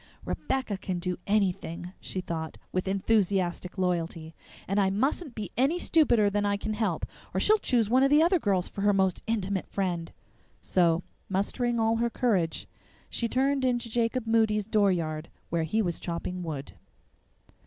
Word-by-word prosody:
"Rebecca 260 -7 -2
can 185 -2 -3
do 180 0 -3
anything," 180 -4 0
she 185 - -4
thought, 160 -3 -5
with 185 +1 -1
enthusiastic 190 -2 +1
loyalty, 170 -3 -1 0.3
"and 195 +2 +1
I 195 -1 +3
mustn't 265 - -1
be 205 -5 -5
any 275 +7 +2
stupider 260 -12 +3
than 205 0 +1
I 200 0 +1
can 215 +1 -3
help, 215 +1 -1 0.3
or - - +2
she'll 430 +1 +5
choose 240 - +2
one 255 +4 +4
of 275 - +5
the 300 +2 +6
other 350 +1 +3
girls 190 - +1
for 200 - -6
her 205 0 +4
most 190 -2 +1
intimate 200 -4 -1
friend." 175 -4 -2 0.5
So, 170 -1 +2 0.3
mustering 235 +5 0
all 225 0 +2
her 235 +1 +1
courage, 195 -10 0 0.4
she 235 - 0
turned 270 +3 +1
into 240 -2 0
Jacob 235 +1 0
Moody's 220 -2 +2
dooryard, 170 -7 +1 0.2
where 170 0 +1
he 215 +7 +1
was 175 -3 -2
chopping 180 +1 -4
wood. 150 -5 -5
200 Hz, 165 wpm, -28 LUFS, 180-230 Hz, 0.5 s, the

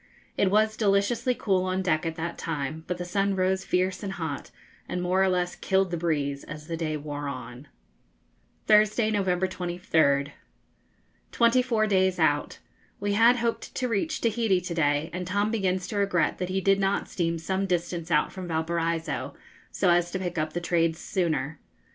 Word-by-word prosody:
It 200 - +2
was 215 +2 +3
deliciously 215 +4 +1
cool 190 -5 +1
on 185 0 -1
deck 165 -2 +1
at 165 - -3
that 170 +1 -4
time; 160 0 -4
but 180 - -2
the 180 - -5
sun 195 +2 0
rose 190 0 +1
fierce 185 +1 0
and 195 -2 -4
hot, 160 -6 -5 0.4
and 180 - -2
more 180 +1 +1
or 190 - +3
less 180 -1 0
killed 190 -1 +1
the - - 0
breeze 145 -4 -1
as 155 0 -9
the 165 +1 -4
day 155 -2 -2
wore 145 -1 -5
on. 130 0 -7 1.0
Thursday, 215 +1 +4
November 190 -3 +1
23rd. 165 -6 +1 1.0
Twenty 235 +1 +4
four 230 -4 +1
days 190 -3 +2
out. 145 -3 +1 0.4
We 205 0 -1
had 230 +4 +6
hoped 235 -1 -2
to 255 - -1
reach 250 +8 -1
Tahiti 225 -4 +2
to 180 -1 -4
day, 150 0 +1
and 180 0 -4
Tom 205 +3 0
begins 190 -4 0
to 210 - -3
regret 195 -5 +1
that 180 - -2
he 190 +1 0
did 195 +1 +3
not 195 0 0
steam 170 -2 -1
some 190 +4 -2
distance 175 -1 -2
out - - +2
from 185 -2 -7
Valparaiso, 165 -1 -2 0.3
so 180 - +2
as 175 0 +3
to 185 - -3
pick 180 -2 -4
up 155 0 -2
the 175 - -1
trades 165 -1 +1
sooner. 160 -5 -2
180 Hz, 180 wpm, -27 LUFS, 165-195 Hz, 1.0 s, had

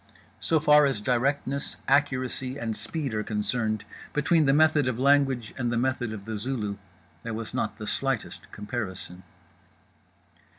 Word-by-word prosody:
So 160 - +2
far 150 -1 +6
as 135 -6 -1
directness, 135 +4 0
accuracy 130 -2 +1
and 115 -4 -3
speed 125 +5 -3
are 110 - 0
concerned, 110 +1 -1 0.3
between 155 +1 +3
the - - +6
method 150 -1 +4
of 125 -3 -1
language 135 -4 +3
and 120 -2 0
the 120 - 0
method 125 -2 0
of 105 -2 -7
The 110 -1 -3
Zulu, 105 -3 -3 0.4
there 115 -1 -4
was 110 0 -6
not 105 -1 -2
the 110 - -6
slightest 135 +2 -2
comparison. 95 -4 -5
125 Hz, 145 wpm, -27 LUFS, 110-140 Hz, 0.4 s, far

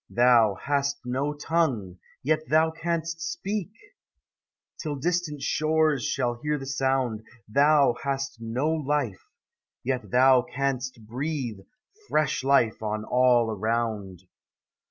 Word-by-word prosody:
Thou 120 -4 +4
hast 140 0 0
no 135 +4 -1
tongue, 135 - -1 0.2
yet 155 +3 0
thou 160 +1 +4
canst 165 0 -3
speak, 195 +3 -3 1.1
Till 150 -3 -3
distant 155 -1 -2
shores 155 -2 +1
shall 120 -3 -1
hear 150 0 0
the 135 - -7
sound; 130 -4 0 0.3
Thou 140 +3 +4
hast 135 -2 -3
no 120 +6 -1
life, 145 -9 -2 0.6
yet 130 0 -2
thou 130 0 +5
canst 130 -3 -3
breathe 125 -2 -3 0.5
Fresh 150 -4 +1
life 135 -6 +3
on 110 0 -3
all 125 -2 +3
around. 110 -4 -2
135 Hz, 115 wpm, -26 LUFS, 120-150 Hz, 1.1 s, thou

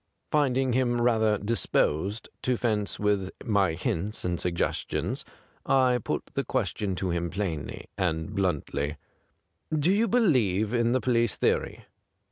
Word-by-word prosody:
Finding 135 -3 +2
him 120 -1 +2
rather 110 -3 +3
disposed 100 -2 0
to 125 -1 +1
fence 105 -4 0
with 100 -2 +1 0.2
my 100 -6 +2
hints 90 +4 -3
and 90 -1 -1
suggestions, 85 -1 -1 0.4
I 130 -2 +3
put - - -3
the - - 0
question 100 -3 -1
to 90 0 -1
him 85 0 -1
plainly 85 -5 -4
and 85 +1 -1
bluntly: 75 -6 -1 0.4
' - - -49 0.2
Do 180 - +5
you 220 +3 +3
believe 120 - +2
in 120 0 +2
the 130 - +2
police 120 -3 +2
theory - - 0
105 Hz, 135 wpm, -27 LUFS, 90-125 Hz, 0.4 s, Do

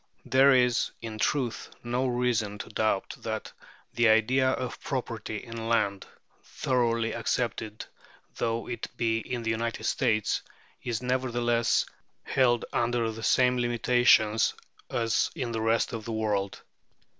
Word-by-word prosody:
There 135 +1 +5
is, 125 -1 +3
in 110 -1 -7
truth, 125 +2 -1
no 125 +2 0
reason 120 -4 0
to - - -7
doubt 110 -3 0
that - - -5 0.4
the 120 -1 +4
idea 125 +4 +4
of 130 -1 -3
property 115 -5 -4
in 115 -1 -6
land, 100 -4 +1 0.4
thoroughly 115 -3 0
accepted 115 -2 -2 0.5
though 115 0 -1
it 120 - -4
be 115 -1 +1
in 120 +1 -4
the 115 - 0
United 115 +1 -2
States, 110 -5 +1 0.4
is 120 0 -3
nevertheless 120 -2 +1 0.4
held 120 -3 +2
under 120 -1 +1
the 110 +1 -8
same 125 +2 +3
limitations 120 -2 +3 0.3
as 115 -2 +1
in 130 -7 -3
the 110 -1 -2
rest 115 +1 +1
of 110 -2 -5
the 115 - -4
world. 105 -3 -1
115 Hz, 135 wpm, -28 LUFS, 110-125 Hz, 0.5 s, There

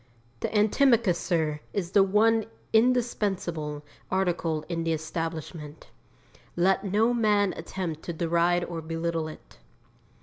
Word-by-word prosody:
The - - -2
antimacassar 200 - +2
is 180 -4 -2
the 200 - +5
one 215 +3 +3 0.3
indispensable 200 -11 0 0.2
article 175 -4 0
in 170 -1 -2
the 165 0 0
establishment. 160 -1 -5 0.6
Let 190 +3 +2
no 215 +4 +2
man 210 -4 +2
attempt 165 -1 -5
to 170 - -3
deride 170 +1 +1
or 165 -2 -5
belittle 165 0 -2
it. 155 - -12
175 Hz, 110 wpm, -27 LUFS, 165-205 Hz, 0.6 s, the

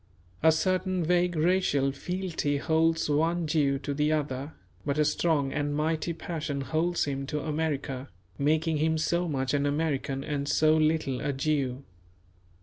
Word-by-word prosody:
A 160 - +6
certain 185 +2 0
vague 175 +1 +2
racial 155 -5 +2
fealty 170 -1 -2
holds 160 +2 +2
one 165 +3 +1
Jew 145 -3 +2
to 140 +1 -4
the 150 +2 +1
other; 145 -1 -2 0.3
but 140 0 -1
a 150 - +3
strong 150 -2 +1
and 145 0 -1
mighty 160 +2 0
passion 155 -4 -4
holds 160 +6 0
him 135 -1 -3
to 150 +1 -2
America, 145 -4 -2 0.3
making 155 +2 +2
him 160 +1 +1
so 170 +2 0
much 135 -3 -1
an 145 0 +1
American 140 -2 -1
and 145 -1 -3
so 155 +2 +4
little 155 -4 +1
a 145 - 0
Jew. 135 -2 -1
155 Hz, 150 wpm, -28 LUFS, 140-160 Hz, 0.3 s, A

